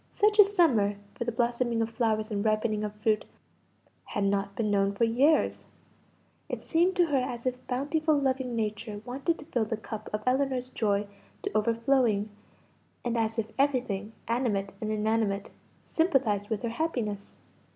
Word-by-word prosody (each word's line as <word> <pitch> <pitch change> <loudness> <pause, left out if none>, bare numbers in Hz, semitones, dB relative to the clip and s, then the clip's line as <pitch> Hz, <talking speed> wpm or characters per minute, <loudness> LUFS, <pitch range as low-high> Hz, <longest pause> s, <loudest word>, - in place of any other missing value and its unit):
Such 420 +1 +2
a - - +13
summer 305 - +3 0.2
for 235 - -4
the 235 - 0
blossoming 235 0 0
of 225 0 0
flowers 220 -2 0
and 200 -1 -1
ripening 215 -1 +1
of 210 0 -4
fruit 210 0 +1 0.8
had 205 - -2
not 200 0 0
been 215 -1 0
known 200 0 +2
for 230 - +1
years; 265 +7 +3 0.8
it - - -4
seemed 355 +3 +2
to 355 -2 +4
her 290 -4 +1
as 245 -1 -4
if 250 0 -3
bountiful 295 +4 +1
loving 260 -3 0
Nature 215 -1 -3
wanted 275 +7 -1
to 295 - -11
fill 240 -7 0
the 220 +1 -3
cup 220 0 -7
of 210 0 -3
Ellinor's 255 -1 +1
joy 205 -2 +1 0.4
to - - -4
overflowing, 230 -1 +2 0.7
and 240 -1 0
as 225 -1 0
if 220 -1 -2
everything, 240 -7 0
animate 220 -5 0
and 215 - -2
inanimate, 215 -1 0 0.3
sympathised 255 - +1
with 220 -1 -2
her 235 - 0
happiness. 230 -7 -3
230 Hz, 160 wpm, -29 LUFS, 210-260 Hz, 0.8 s, a